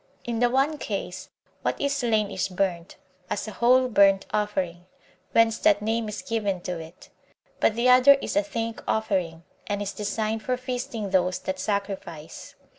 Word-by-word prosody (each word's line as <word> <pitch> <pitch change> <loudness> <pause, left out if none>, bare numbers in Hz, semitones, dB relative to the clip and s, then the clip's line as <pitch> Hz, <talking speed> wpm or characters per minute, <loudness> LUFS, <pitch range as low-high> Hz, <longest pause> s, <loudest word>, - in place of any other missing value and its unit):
In 235 -1 -3
the 245 0 +4
one 275 +4 +1
case, 190 -2 -5 0.3
what - - -1
is 280 0 0
slain 220 -6 +1
is 185 - -1
burnt, 180 -2 -2 0.3
as 205 - -2
a - - -5
whole 255 +3 +4
burnt 195 -4 +4
offering, 185 -4 -2 0.4
whence 230 -1 +3
that 205 - +4
name 225 0 -1
is 210 - -6
given 205 -5 -1
to 175 -1 -4
it; 160 +3 -12 0.5
but 215 - +3
the 235 +2 +2
other 255 +2 +8
is 275 - -4
a 300 - +5
thank 230 -7 -4
offering, 185 -7 -1 0.2
and 205 -1 -1
is 205 -1 -3
designed 215 +1 -2
for 250 +3 -1
feasting 245 -5 -4
those 180 -1 +2
that 190 0 -4
sacrifice. 190 -6 -4
210 Hz, 170 wpm, -25 LUFS, 190-235 Hz, 0.5 s, other